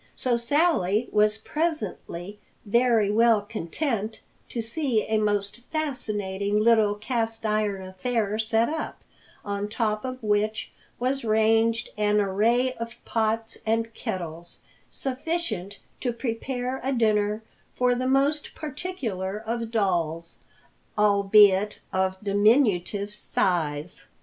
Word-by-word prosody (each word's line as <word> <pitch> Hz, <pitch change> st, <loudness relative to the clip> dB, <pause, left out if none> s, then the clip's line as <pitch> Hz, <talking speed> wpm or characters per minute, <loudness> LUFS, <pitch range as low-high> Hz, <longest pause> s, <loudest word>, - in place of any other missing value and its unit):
So 250 Hz, -2 st, +1 dB
Sally 235 Hz, -, +2 dB
was 210 Hz, 0 st, +3 dB
presently 215 Hz, -, -3 dB, 0.3 s
very 230 Hz, -1 st, +3 dB
well 225 Hz, 0 st, +5 dB
content 220 Hz, -, -3 dB, 0.3 s
to 240 Hz, -, -4 dB
see 230 Hz, 0 st, 0 dB
a 220 Hz, 0 st, 0 dB
most 205 Hz, 0 st, 0 dB
fascinating 210 Hz, -10 st, -1 dB
little 215 Hz, -2 st, +4 dB
cast 225 Hz, +1 st, -2 dB
iron 210 Hz, -2 st, 0 dB
affair 210 Hz, +2 st, -1 dB
set 225 Hz, +1 st, +2 dB
up, 315 Hz, +1 st, -4 dB, 0.4 s
on 200 Hz, 0 st, -2 dB
top 215 Hz, -1 st, -1 dB
of 255 Hz, -1 st, -4 dB
which 215 Hz, +1 st, 0 dB, 0.3 s
was 260 Hz, +2 st, -1 dB
ranged 225 Hz, +1 st, +2 dB
an 210 Hz, 0 st, +2 dB
array 225 Hz, +6 st, +2 dB
of 230 Hz, 0 st, -6 dB
pots 225 Hz, 0 st, 0 dB
and 225 Hz, +1 st, 0 dB
kettles 170 Hz, -3 st, -5 dB, 0.3 s
sufficient 255 Hz, -, -3 dB, 0.2 s
to 245 Hz, -, -1 dB
prepare 245 Hz, +2 st, -3 dB
a 265 Hz, -, 0 dB
dinner 215 Hz, -2 st, +1 dB, 0.3 s
for 250 Hz, 0 st, +3 dB
the 255 Hz, +1 st, -1 dB
most 280 Hz, +3 st, +1 dB
particular 265 Hz, -, -4 dB
of 230 Hz, +1 st, -3 dB
dolls, 170 Hz, -7 st, -1 dB, 0.6 s
albeit 205 Hz, -1 st, +5 dB, 0.2 s
of 190 Hz, 0 st, +1 dB
diminutive 205 Hz, -1 st, +2 dB
size. 170 Hz, -6 st, -1 dB
220 Hz, 110 wpm, -26 LUFS, 205-240 Hz, 0.6 s, well